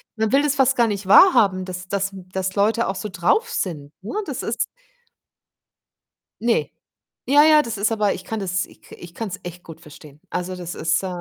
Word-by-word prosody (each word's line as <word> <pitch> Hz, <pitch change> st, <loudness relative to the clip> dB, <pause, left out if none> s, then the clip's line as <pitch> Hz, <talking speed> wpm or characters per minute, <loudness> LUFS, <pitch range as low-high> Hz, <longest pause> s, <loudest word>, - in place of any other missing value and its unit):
man 220 Hz, -1 st, -1 dB
will 280 Hz, +2 st, +4 dB
das 290 Hz, -2 st, +1 dB
fast 265 Hz, -1 st, +3 dB
gar 240 Hz, -1 st, +4 dB
nicht 200 Hz, -2 st, -4 dB
wahrhaben, 195 Hz, -, +6 dB
dass 180 Hz, 0 st, -7 dB
dass 195 Hz, 0 st, -1 dB, 0.2 s
dass 190 Hz, 0 st, -2 dB
Leute 220 Hz, +3 st, +2 dB
auch 190 Hz, -, -2 dB
so 210 Hz, +2 st, -5 dB
drauf 430 Hz, -, +1 dB
sind, 150 Hz, -, -4 dB
ne? 210 Hz, -, -6 dB
Das 275 Hz, -, -4 dB
ist 230 Hz, -, -1 dB, 1.8 s
Ne. 235 Hz, 0 st, +1 dB, 0.6 s
Ja, 290 Hz, +2 st, +7 dB
ja, 310 Hz, -1 st, +6 dB
das 230 Hz, -6 st, -5 dB
ist 210 Hz, +3 st, +1 dB
aber 210 Hz, -2 st, +1 dB
ich 185 Hz, -, -10 dB
kann 225 Hz, -, -4 dB
das 185 Hz, -2 st, -1 dB
ich -, -, -20 dB
ka -, -, -14 dB
ich 170 Hz, 0 st, -12 dB
kann's 200 Hz, -5 st, -5 dB
echt 175 Hz, 0 st, -9 dB
gut 165 Hz, -1 st, -12 dB
verstehen. 150 Hz, -2 st, -15 dB
Also, 180 Hz, +1 st, -3 dB
das 175 Hz, -1 st, -6 dB
ist 165 Hz, +3 st, 0 dB
äh, -, -, -2 dB
195 Hz, 205 wpm, -22 LUFS, 180-230 Hz, 1.8 s, Ja